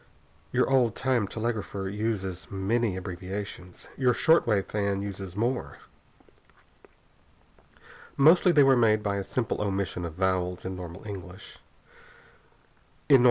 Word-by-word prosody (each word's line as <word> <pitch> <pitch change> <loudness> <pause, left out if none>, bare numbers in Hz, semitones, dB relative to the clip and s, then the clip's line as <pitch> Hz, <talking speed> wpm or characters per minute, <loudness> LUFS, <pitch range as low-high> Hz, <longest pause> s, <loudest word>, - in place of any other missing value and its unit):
Your - - +2
old 125 -5 +2
time 125 -6 +1
telegrapher 110 -3 -3
uses 95 -3 -3
many 100 +1 0
abbreviations. 90 0 -7
Your 125 -3 +2
short 160 -4 +4
wave 105 -4 +2
fan 100 -1 -1
uses 95 -2 -6
more. 120 +4 -2 2.4
Mostly 170 +6 +6
they 150 -4 +6
are 135 -1 +5
made 110 -3 +3
by 100 -1 -1
a 100 - -2
simple 115 +2 -2
omission 95 -3 -2
of 85 -2 -6
vowels 90 -1 -1
in 95 0 -4
normal 90 +1 -9
English 95 -1 -9 1.5
words. 135 - +9
100 Hz, 120 wpm, -27 LUFS, 95-120 Hz, 2.4 s, words